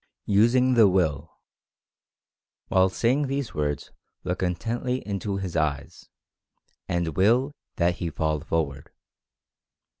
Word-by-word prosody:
USING 120 +5 +4
THE 115 -4 +6
WILL. 80 -7 0 1.4
While 95 0 +4
saying 130 +9 +1
these 135 -2 -3
words 75 -1 -2 0.3
look 90 0 -3
intently 115 +8 -2
into 100 0 -3
his 95 -3 -5
eyes, 70 -2 -2 0.8
and 85 -1 0
WILL 115 - +2 0.2
that 85 0 +1
he 85 - -3
fall 80 -1 -1
forward. 75 -3 -3
95 Hz, 110 wpm, -25 LUFS, 80-115 Hz, 1.4 s, THE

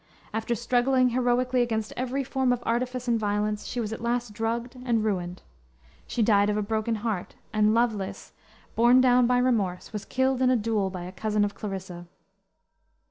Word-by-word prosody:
After 225 +2 -1
struggling 250 +2 +2
heroically 250 +1 +1
against 220 -3 -1
every 260 +2 -2
form 265 -1 0
of 245 -1 -1
artifice 250 +1 -1
and 235 -1 +2
violence, 210 0 -1
she 245 - -4
was 220 -2 -2
at 225 - -7
last 235 -1 -1
drugged 230 +3 -3
and 235 -3 +1
ruined. 180 -4 -2 0.6
She 235 - 0
died 205 -1 +4
of 210 - 0
a 210 - 0
broken 220 +2 -1
heart, 210 -6 -3 0.2
and 215 0 +3
Lovelace, 220 -5 -1 0.4
borne 240 +2 +6
down 250 -1 +5
by 250 0 +3
remorse, 220 -8 0
was 210 -1 -5
killed 260 0 0
in 255 - +4
a 255 - +4
duel 210 -3 0
by 185 -2 -6
a 180 - -7
cousin 210 +1 0
of 205 - -4
Clarissa. 190 -4 -7
230 Hz, 180 wpm, -26 LUFS, 210-245 Hz, 0.6 s, borne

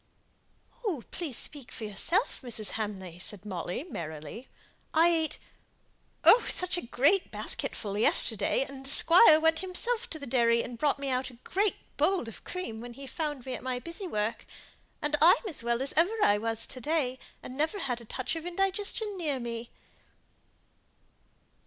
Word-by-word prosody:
"Please 300 -9 -3
speak 285 -5 -6
for - - -7
yourself, 330 - +3
Mrs. 230 -5 -1
Hamley," 190 -5 -5
said 205 +2 -3
Molly, 180 - -3
merrily. 160 - -7 0.5
"I 330 +2 +6
ate 325 -2 0 0.9
oh, 485 - +8
such 365 0 0
a 350 - -1
great 280 +11 +2
basketful 200 -3 -3
yesterday, 220 +4 +2
and 270 -1 -10
the 270 - -5
squire 330 +2 +7
went 320 0 +3
himself 465 +6 -2
to 315 - -5
the 285 - -7
dairy 235 -2 +3
and 235 -1 -8
brought 285 -1 +1
out 260 -1 -1
a 250 - -14
great 400 +2 +1 0.2
bowl 390 -1 +3
of 225 - -10
cream, 295 -12 -5
when 240 0 -8
he 275 +3 -9
found 295 -2 -4
me 260 - -4
at - - -5
my 255 -1 -2
busy 335 - -6
work. 215 -6 -2 0.6
And 295 0 +1
I'm 335 +3 +8
as 310 -10 -3
well 235 +2 0
as 275 - -3
ever 350 +8 +3
I 205 0 +4
was, 225 +1 -1
to 255 - -6
day, 260 -3 0 0.2
and 255 - -8
never 315 +8 0
had 250 -10 -2
a - - -12
touch 260 +7 -3
of 325 - -5
indigestion 390 +3 -1
near 295 -6 -1
me." 235 -1 -5
270 Hz, 165 wpm, -29 LUFS, 230-335 Hz, 0.9 s, oh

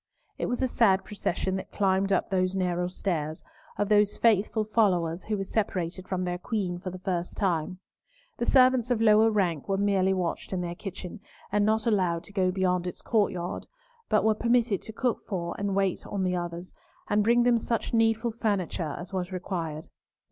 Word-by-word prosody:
It - - -1
was 245 +2 -1
a - - +3
sad 200 -6 +3
procession 190 -2 -2
that 190 - -8
climbed 195 -1 +1
up 195 - +1
those 185 0 +1
narrow 180 -1 0
stairs, 160 -4 -3 0.3
of 205 - 0
those 210 0 +3
faithful 220 -1 +3
followers 185 -6 +1
who 210 -1 -1
were 195 - -2
separated 185 -3 -2
from 185 -1 -2
their 180 0 -2
Queen 185 -4 -2
for 185 0 -5
the 185 - -7
first 180 -1 -3
time. 185 -2 0 0.6
The 235 - -1
servants 255 -2 +5
of 245 -3 +1
lower 220 0 +5
rank 180 -9 0
were 195 - +1
merely 195 -1 +2
watched 180 +1 -3
in 185 - -1
their 175 -1 -3
kitchen, 190 +2 -7 0.3
and 205 0 +2
not 220 0 +1
allowed 180 -7 +1
to 200 - -14
go 190 -2 +2
beyond 180 -1 0
its 180 - -7
courtyard, 190 -5 -1 0.4
but 215 - +3
were 220 0 +4
permitted 235 -2 +1
to - - -9
cook 240 +1 -1
for 170 -4 -3
and 200 -1 -1
wait 195 -2 0
on 200 -2 -2
the 180 -1 0
others, 175 0 -5 0.3
and 210 0 +2
bring 240 +2 +4
them 240 -1 +4
such 230 +1 -2
needful 225 +1 +2
furniture 190 -8 -2
as 175 +2 -8
was 185 -1 -2
required. 170 -4 -4
195 Hz, 190 wpm, -27 LUFS, 180-215 Hz, 0.6 s, servants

